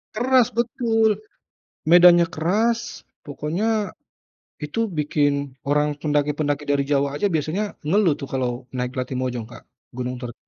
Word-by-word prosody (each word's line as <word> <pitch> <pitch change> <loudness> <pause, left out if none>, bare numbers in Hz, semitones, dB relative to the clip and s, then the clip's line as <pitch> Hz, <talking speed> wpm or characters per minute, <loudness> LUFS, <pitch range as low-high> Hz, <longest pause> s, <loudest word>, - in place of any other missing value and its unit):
Keras, 250 0 +4
betul. 225 -2 +2 0.8
Medannya 175 0 +7
keras, 225 +9 -1 0.2
pokoknya 150 +8 -3 0.9
itu 150 +8 -4 0.2
bikin 145 -2 0
orang 150 0 +2
pendaki-pendaki 145 0 -1
dari 140 -1 +2
Jawa 140 -1 +1
aja 205 - +1
biasanya 160 +5 -1 0.2
ngeluh 190 -2 +3
tuh - - -5
kalau 130 -2 -1 0.2
naik 125 0 -2
Latimojong, 125 -2 -3
Kak, 125 - -13 0.3
gunung 125 0 -4
ter 120 -2 -6
150 Hz, 120 wpm, -22 LUFS, 140-190 Hz, 0.9 s, Medannya